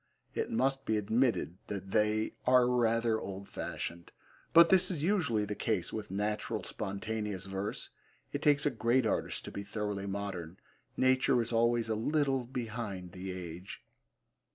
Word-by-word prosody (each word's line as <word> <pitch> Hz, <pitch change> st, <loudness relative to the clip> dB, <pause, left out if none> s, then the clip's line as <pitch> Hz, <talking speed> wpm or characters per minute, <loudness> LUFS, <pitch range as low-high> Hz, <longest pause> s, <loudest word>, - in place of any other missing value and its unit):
It -, -, -1 dB
must 135 Hz, +3 st, +1 dB
be 110 Hz, -, +1 dB
admitted 110 Hz, -4 st, +1 dB
that 95 Hz, -1 st, -5 dB
they 105 Hz, +1 st, +2 dB
are 125 Hz, -1 st, +6 dB
rather 115 Hz, -2 st, +2 dB
old 100 Hz, 0 st, -6 dB
fashioned, 85 Hz, 0 st, -5 dB, 0.4 s
but 170 Hz, 0 st, +8 dB
this 190 Hz, 0 st, +5 dB
is 160 Hz, -6 st, -2 dB
usually 160 Hz, -, +2 dB
the 105 Hz, -, -3 dB
case 110 Hz, +2 st, -1 dB
with 110 Hz, -1 st, -4 dB
natural 105 Hz, +2 st, -2 dB
spontaneous 105 Hz, -1 st, -3 dB
verse. 95 Hz, +1 st, -4 dB, 0.4 s
It -, -, -2 dB
takes 145 Hz, -1 st, +4 dB
a 145 Hz, -, +3 dB
great 120 Hz, +1 st, +2 dB
artist -, -, -1 dB
to -, -, -6 dB
be 100 Hz, -, -5 dB
thoroughly 100 Hz, -1 st, -3 dB
modern. 95 Hz, -4 st, -4 dB, 0.4 s
Nature 130 Hz, 0 st, +4 dB
is 120 Hz, 0 st, -1 dB
always 115 Hz, 0 st, +3 dB
a 110 Hz, -, 0 dB
little 135 Hz, +2 st, +1 dB
behind 115 Hz, -7 st, -5 dB
the 95 Hz, +1 st, -6 dB
age. 90 Hz, 0 st, -7 dB
110 Hz, 155 wpm, -32 LUFS, 100-125 Hz, 0.4 s, but